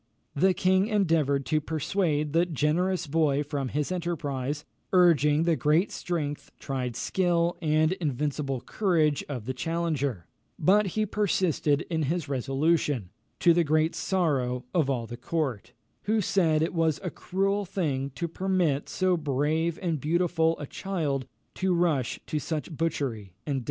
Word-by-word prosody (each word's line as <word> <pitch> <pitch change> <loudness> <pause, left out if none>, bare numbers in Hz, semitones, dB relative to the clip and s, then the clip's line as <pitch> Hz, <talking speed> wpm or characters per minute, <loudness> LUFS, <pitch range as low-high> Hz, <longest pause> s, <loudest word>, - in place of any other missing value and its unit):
The 185 +5 +3
king 190 +2 +3
endeavoured 160 - +2
to 155 +5 +1
persuade 155 -1 -1
the 170 +2 +3
generous 170 +4 0
boy 145 -1 +1
from 145 -2 -3
his 150 +5 -2
enterprise, 150 -5 -3 0.3
urging 160 -4 +4
the 165 -1 +2
great 155 +6 +2
strength, 150 -5 -3
tried 125 -4 -3
skill, 175 0 +1
and 155 0 +2
invincible 145 -5 -2
courage 160 - +1
of 125 -7 -5
the 130 - -2
challenger; 145 - -2 0.3
but 200 +6 +4
he 215 - +2
persisted 185 -8 +1
in 160 -2 -1
his 155 +2 -1
resolution, 135 - 0 0.3
to 170 - +6
the 170 0 +3
great 155 +2 +2
sorrow 135 -10 0
of 160 -6 +2
all 125 -4 -1
the 120 +1 -8
court, 125 -5 -2 0.3
who 215 +1 +2
said 165 -6 +2
it 165 - -1
was 165 -3 +1
a 180 - -3
cruel 195 +2 -1
thing 145 -8 -2
to 170 - -2
permit 175 -5 0
so 185 -1 +1
brave 155 +2 0
and 165 -6 -1
beautiful 165 0 +1
a 145 - -5
child 145 -6 -3 0.3
to 185 -1 0
rush 160 -8 +1
to 155 - -2
such 150 +3 -4
butchery 125 - -2
and 140 -2 -1
death. - - 0
155 Hz, 150 wpm, -27 LUFS, 140-175 Hz, 0.3 s, to